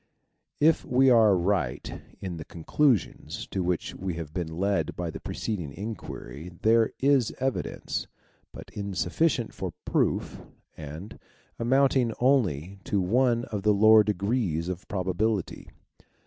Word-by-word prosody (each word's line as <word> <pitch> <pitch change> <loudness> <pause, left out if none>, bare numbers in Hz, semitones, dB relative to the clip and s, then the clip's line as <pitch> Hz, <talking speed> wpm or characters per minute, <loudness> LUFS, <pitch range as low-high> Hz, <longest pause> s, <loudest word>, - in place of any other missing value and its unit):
If 160 +2 +4
we 130 -2 +4
are 110 -5 +6
right 85 -8 -1 0.2
in 90 -3 -5
the 80 - -6
conclusions 115 - 0
to 95 - -1
which 90 -1 -1
we 95 -2 -4
have 80 -3 -7
been 85 -3 -4
led 100 +2 0
by 85 -2 -3
the - - -7
preceding 90 -10 -4
inquiry 85 - -7
there 115 0 +4
is 135 -4 +3
evidence, 130 0 -2 0.4
but - - -11
insufficient 100 - -1
for - - -5
proof, - - 0 0.3
and 80 +8 -9 0.4
amounting 130 -1 +3
only 100 - +1
to 100 - 0
one 120 +5 +2
of 105 -2 -2
the 105 +1 +3
lower 110 +1 +7
degrees 100 -5 -1
of 90 0 -6
probability. 95 +1 -2
100 Hz, 130 wpm, -27 LUFS, 90-120 Hz, 0.4 s, lower